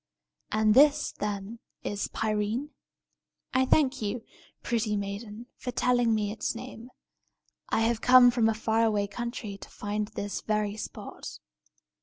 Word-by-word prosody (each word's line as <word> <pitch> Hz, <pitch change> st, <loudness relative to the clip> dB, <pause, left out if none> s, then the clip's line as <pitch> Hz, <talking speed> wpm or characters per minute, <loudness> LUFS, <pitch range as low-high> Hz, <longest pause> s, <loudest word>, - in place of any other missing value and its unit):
And 215 Hz, 0 st, +3 dB
this, 290 Hz, +4 st, +5 dB
then, 205 Hz, +2 st, -4 dB, 0.2 s
is 205 Hz, 0 st, -2 dB
Pirene? 220 Hz, +6 st, -1 dB, 0.8 s
I 260 Hz, 0 st, +3 dB
thank 270 Hz, -4 st, +3 dB
you, 220 Hz, +2 st, -3 dB, 0.4 s
pretty 220 Hz, -3 st, 0 dB
maiden, 205 Hz, +3 st, -5 dB
for 250 Hz, -, -6 dB
telling 245 Hz, -2 st, +2 dB
me 210 Hz, -1 st, -1 dB
its 220 Hz, -, -3 dB
name. 245 Hz, 0 st, -9 dB, 0.8 s
I -, -, +1 dB
have 225 Hz, 0 st, +1 dB
come 250 Hz, -1 st, +8 dB
from 230 Hz, -2 st, +2 dB
a 220 Hz, -, 0 dB
far 225 Hz, +1 st, +1 dB
away 210 Hz, -2 st, +2 dB
country 220 Hz, -2 st, -5 dB
to -, -, -11 dB
find 210 Hz, 0 st, -3 dB
this 205 Hz, -2 st, -5 dB
very 210 Hz, -1 st, -1 dB
spot." 220 Hz, -, -8 dB
220 Hz, 140 wpm, -28 LUFS, 210-245 Hz, 0.8 s, come